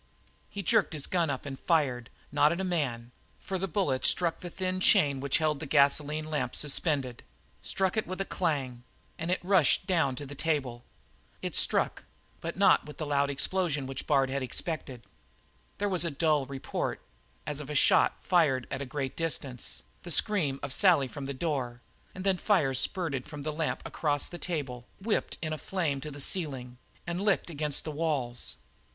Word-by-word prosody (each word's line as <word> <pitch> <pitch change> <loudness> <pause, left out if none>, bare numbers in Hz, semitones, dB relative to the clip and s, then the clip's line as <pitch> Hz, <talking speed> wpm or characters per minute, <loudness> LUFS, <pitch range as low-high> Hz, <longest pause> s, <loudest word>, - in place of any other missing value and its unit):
He 200 - -5
jerked 220 -3 +3
his 150 -3 -2
gun 170 -4 +1
up 135 0 -3
and 135 -2 -6
fired, 130 -8 +1 0.2
not 145 +1 +4
at 170 - -2
a - - -1
man, 130 -10 -2 0.3
for 190 -1 -4
the 195 - -1
bullet 150 -8 0
struck 170 -2 +2
the 175 - -7
thin 185 +1 -2
chain 140 -6 +4
which 140 0 +1
held 155 -2 0
the 155 - -6
gasoline 150 +2 +2
lamp 155 -1 -2
suspended, 140 -4 +1 0.4
struck 190 0 0
it 220 - 0
with 185 +1 -5
a 195 - -1
clang, 135 -11 -2 0.4
and 165 +1 -3
it 185 - +1
rushed 185 -5 +3
down 165 -9 +1
to 145 - -6
the 140 - -8
table. 135 -6 -1 0.6
It - - -2
struck, - - +3 0.3
but - - -5
not - - +5
with 150 - -10
the 155 - -3
loud 140 -1 +1
explosion 145 0 0
which 135 0 -5
Bard 135 -3 +3
had 140 0 -1
expected. 130 -1 -3 0.7
There 205 - 0
was 185 -3 +2
a 170 - 0
dull 150 -2 +1
report, 135 -1 -3 0.5
as 145 -1 -2
of 150 -1 -7
a 150 - -4
shot - - +4
fired 150 -8 +3
at 135 - -3
a 140 - -4
great 135 0 -3
distance, 140 - -3 0.2
the - - -9
scream 155 -10 +2
of 140 -2 -2
Sally 170 -8 +5
from 140 +1 -7
the - - -3
door, 130 -5 -2 0.4
and 185 - -6
then 190 -1 +2
liquid - - -15
fire 165 -11 +4
spurted 140 -1 +2
from 150 -2 -8
the 155 - -2
lamp 160 +1 -2
across 145 -3 -1
the 175 - -8
table, 140 -8 -4
whipped 210 +3 -1
in 155 -1 -2
a 155 - -5
flare 165 -8 -1
to 150 - -6
the 145 0 -9
ceiling, 135 -7 -2 0.3
and 175 +2 -3
licked 200 -4 +1
against 150 -2 -1
the 155 - -4
walls. 145 -6 -1
150 Hz, 190 wpm, -29 LUFS, 135-175 Hz, 0.7 s, not